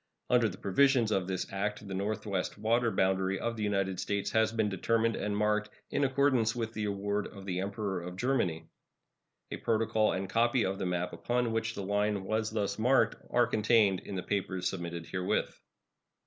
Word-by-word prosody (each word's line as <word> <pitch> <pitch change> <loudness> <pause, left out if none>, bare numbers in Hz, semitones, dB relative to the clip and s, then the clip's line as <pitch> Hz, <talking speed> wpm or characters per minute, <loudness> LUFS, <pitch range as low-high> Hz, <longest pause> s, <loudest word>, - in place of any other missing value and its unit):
Under 120 -3 +4
the - - -9
provisions 125 +2 +3
of 95 -3 +1
this 95 -1 -2
act 105 +1 -2
the 95 - -5
northwest 100 -1 -2
water 115 +3 +2
boundary 95 -1 +1
of 115 +2 -2
the 110 - -6
United 100 -3 0
States 100 -1 -1
has 110 0 +3
been 110 -2 +1
determined 115 +3 +1
and 105 0 -2
marked 105 0 +1 0.2
in 145 - +1
accordance 130 -4 +2
with 115 -2 -3
the 110 -2 -2
award 100 0 -1
of 100 -2 -11
the 90 -2 -2
Emperor 100 -1 -2
of 90 +1 -7
Germany. 100 -8 0 0.9
A - - -3
protocol 110 -1 +1
and 95 +1 -2
a - - -7
copy 120 +4 +2
of 95 +1 -2
the - - -1
map 90 0 -2
upon 120 -1 0
which 115 0 -1
the 100 - -4
line 105 0 0
was 110 +2 -1
thus 105 -1 -2
marked 115 -1 +2
are 120 0 +4
contained 105 -4 +3
in 100 - -7
the 90 - -3
papers 95 -2 -1
submitted 85 -2 -4
herewith. 90 +1 -2
105 Hz, 190 wpm, -31 LUFS, 95-115 Hz, 0.9 s, Under